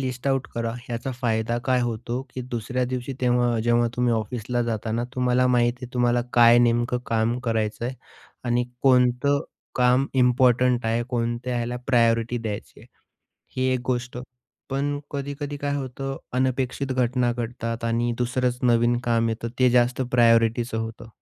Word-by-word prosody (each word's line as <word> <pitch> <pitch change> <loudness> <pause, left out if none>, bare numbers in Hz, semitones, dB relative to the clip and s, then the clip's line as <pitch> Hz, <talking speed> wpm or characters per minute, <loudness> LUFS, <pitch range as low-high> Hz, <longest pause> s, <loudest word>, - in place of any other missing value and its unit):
List 130 0 -4
out 135 -1 0
करा. 115 -1 -2
याचा 120 +2 -3
फायदा 115 -1 0
काय 130 -1 +2
होतो 120 +1 -2
की 130 - -4
दुसऱ्या 125 +2 -2
दिवशी 125 +1 -4
तेव्हा 120 -2 +2
जेव्हा 120 +1 +2
तुम्ही 125 -1 +2
ऑफिसला 120 +2 -2
जाताना 115 0 -2
तुम्हाला 125 0 +2
माहीती 125 0 +1
आहे, 120 - -11
तुम्हाला 120 0 +2
काय 120 0 +7
नेमकं 120 +1 +2
काम 115 +1 0
करायचं 110 0 -1
आहे 125 - -3 0.5
आणि 120 0 +1 0.2
कोणतं 130 +2 +3 0.3
काम 125 +2 +3
इम्पोर्टंट 125 -1 +3
आहे? 115 +1 +1
कोणत्या 120 0 -2
ह्याला 120 +1 -2
प्रायोरिटी 115 -1 +2
द्यायची 110 -3 -6
आहे - - -16 0.7
ही 130 0 +1
एक 125 - -1
गोष्ट. 125 -1 -2 0.5
पण 145 +2 -1
कधी-कधी 145 +1 -4
काय 140 0 -2
होतं 135 0 -4 0.2
अनपेक्षित 130 +1 -1
घटना 125 -1 +1
घडतात 115 -1 -4
आणि 120 +1 0
दुसरंच 125 0 0
नवीन 120 0 +3
काम 115 -1 +2
येतं, 115 +1 -3
ते 130 -1 +5
जास्त 125 +1 +2
प्रायोरिटीचं 115 -1 +3
होतं 115 0 -6
120 Hz, 150 wpm, -24 LUFS, 115-125 Hz, 0.7 s, काय